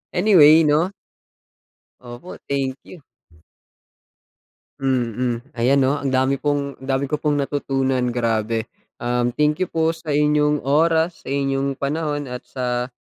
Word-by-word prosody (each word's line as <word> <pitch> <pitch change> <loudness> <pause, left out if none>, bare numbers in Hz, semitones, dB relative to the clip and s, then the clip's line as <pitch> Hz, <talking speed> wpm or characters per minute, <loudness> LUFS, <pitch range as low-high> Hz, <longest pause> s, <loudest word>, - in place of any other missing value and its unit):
Anyway 165 -5 +6
'no? 155 +5 +2 1.1
Opo, 120 +8 -10
thank 135 -1 -1
you. 180 - -13 1.8
Mm. 125 -2 -1 0.2
Ayan 135 +4 +3
'no, 140 +3 +1
ang 135 -2 -2
dami 130 +1 +1
pong 145 -2 -2
dami 135 0 -2
ko 150 - 0
pong 145 -2 0
natutunan, 135 -3 -1
grabe. 115 -1 -1 0.3
Um, 120 0 0
thank 150 +1 +1
you 185 - 0
po 160 0 0
sa 160 -2 -5
inyong 150 0 +2
oras, 160 +4 +1
sa - - -9
inyong 135 0 -1
panahon, 145 0 -3
at 125 0 -7
sa 125 -1 -2
140 Hz, 130 wpm, -21 LUFS, 125-150 Hz, 1.8 s, Anyway